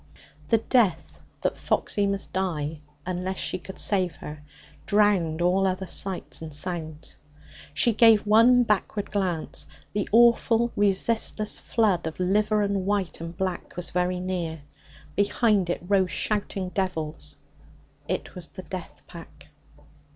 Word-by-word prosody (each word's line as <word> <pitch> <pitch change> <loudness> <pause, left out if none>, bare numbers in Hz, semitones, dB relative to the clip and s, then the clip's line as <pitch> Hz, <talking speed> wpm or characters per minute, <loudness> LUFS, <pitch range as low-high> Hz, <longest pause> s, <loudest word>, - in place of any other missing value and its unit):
The 225 - +4
death 215 -7 +1 0.2
that - - -1
Foxy 205 -2 0
must 200 -1 -2
die, 160 -5 -2 0.3
unless 185 +1 -3
she 185 - -2
could 190 +1 -10
save 185 -6 +1
her, 150 0 -9 0.5
drowned 190 -6 +2
all 190 +2 +3
other 185 0 -2
sights 185 0 -3
and 160 -1 -7
sounds. 160 0 -4 0.6
She 230 +9 +3
gave 225 -1 +6
one 230 +4 +6
backward 210 -2 -1
glance. 185 -6 -1 0.3
The 205 -1 -1
awful 235 +1 +4
resistless 210 +1 +1
flood 200 -8 +1
of 160 - -6
liver 210 +3 +2
and 200 -2 -1
white 200 -5 -1
and 165 +1 -7
black 185 -2 -3
was 180 - -3
very 180 0 0
near. 175 -4 -3 0.5
Behind 205 -2 +2
it 175 - -2
rose 190 -2 +3
shouting 200 -2 -1
devils. 170 -5 -3 0.7
It - - -3
was - - -4
the - - -10
death - - -8
pack. - - -13
190 Hz, 135 wpm, -26 LUFS, 175-210 Hz, 0.7 s, gave